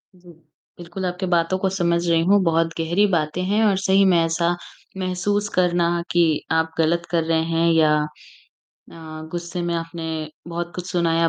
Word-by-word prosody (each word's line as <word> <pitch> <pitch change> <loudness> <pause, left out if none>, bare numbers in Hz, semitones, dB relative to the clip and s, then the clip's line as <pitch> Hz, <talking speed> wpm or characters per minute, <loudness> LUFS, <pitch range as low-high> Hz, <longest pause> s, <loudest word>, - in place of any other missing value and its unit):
जी, 175 -1 -18 0.5
बिल्कुल 175 +2 -6
आपकी 180 +1 -3
बातों 170 +2 +2
को 190 - 0
समझ 170 -2 0
रही 165 -1 +3
हूँ, 200 +2 +5
बहुत 165 -1 +2
गहरी 175 +6 +2
बातें 165 -1 -1
हैं 210 +3 +1
और 200 -2 +3
सही 195 0 +3
में 180 -2 +4
ऐसा 170 +1 0 0.4
महसूस 200 +3 -1
करना 175 -1 +2
कि 175 0 +4 0.3
आप 160 0 +1
गलत 170 +2 +1
कर 165 -2 +1
रहे 160 0 +1
हैं 165 0 +2
या 155 -2 +4 1.0
अ, 155 -1 -9
गुस्से 175 +1 -4
में 170 0 -1
आपने 165 0 -5 0.4
बहुत 170 0 -4
कुछ 180 0 -6
सुनाया 165 -2 +2
170 Hz, 170 wpm, -22 LUFS, 165-180 Hz, 1.0 s, हूँ